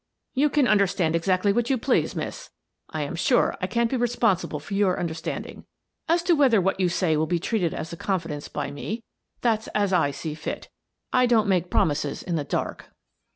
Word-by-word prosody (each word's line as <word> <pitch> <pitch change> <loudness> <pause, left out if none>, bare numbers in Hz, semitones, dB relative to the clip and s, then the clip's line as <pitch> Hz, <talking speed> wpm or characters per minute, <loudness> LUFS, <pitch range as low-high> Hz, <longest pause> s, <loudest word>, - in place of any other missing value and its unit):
" - - -56
You 290 +3 +3
can 290 -3 +3
understand 195 -6 +2
exactly 185 +4 +2
what 240 +1 0
you 265 - +3
please, 250 +3 +1
Miss. - - -5 0.4
I - - -3
am - - -4
sure - - +2
I - - 0
can't 235 -1 0
be 265 - +1
responsible 230 -10 +1
for 155 +7 -8
your 195 -2 +2
understanding. 165 -1 -5 0.4
As 340 +1 +3
to 350 - +3
whether 270 -8 +5
what 190 +1 0
you 185 -2 +3
say 175 -2 +1
will 155 +1 +1
be 175 - +1
treated 175 -1 0
as 160 - -5
a - - -6
confidence 165 -7 -3
by - - -4
me, 215 +11 -5 0.4
that's 220 -2 +1
as 205 -2 +2
I 165 -5 +3
see 145 +2 -5
fit 155 +1 -6 0.4
I 250 -1 +4
don't 225 -3 +3
make 180 -2 +1
promises 145 -2 0
in 175 - -2
the 150 - -1
dark." - - -3
190 Hz, 200 wpm, -25 LUFS, 165-235 Hz, 0.4 s, whether